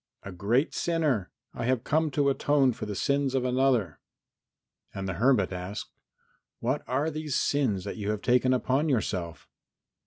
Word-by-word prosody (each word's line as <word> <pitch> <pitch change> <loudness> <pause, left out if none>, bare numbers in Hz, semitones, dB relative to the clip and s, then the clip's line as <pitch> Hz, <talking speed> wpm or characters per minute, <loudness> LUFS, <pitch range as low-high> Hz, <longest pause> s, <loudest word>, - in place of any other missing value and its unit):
"A 100 - -7
great 110 - +1
sinner. 150 - 0 0.2
I 115 - -4
have 125 -2 +1
come 155 +1 +1
to 140 0 +2
atone 135 -2 +2
for 110 - -6
the 105 - -4
sins 140 +4 0
of 130 -1 +1
another." 125 - +1 1.0
And 95 0 -4
the 95 - -2
hermit 110 -1 +2
asked, 90 +3 -6 0.7
"What 130 +5 -1
are 140 +5 0
these 155 -2 -3
sins 115 -10 +1
you 105 0 -4
have 105 -1 -2
taken 125 +1 +3
upon 130 +4 +1
yourself?" 90 - -2
125 Hz, 155 wpm, -28 LUFS, 100-140 Hz, 1.0 s, taken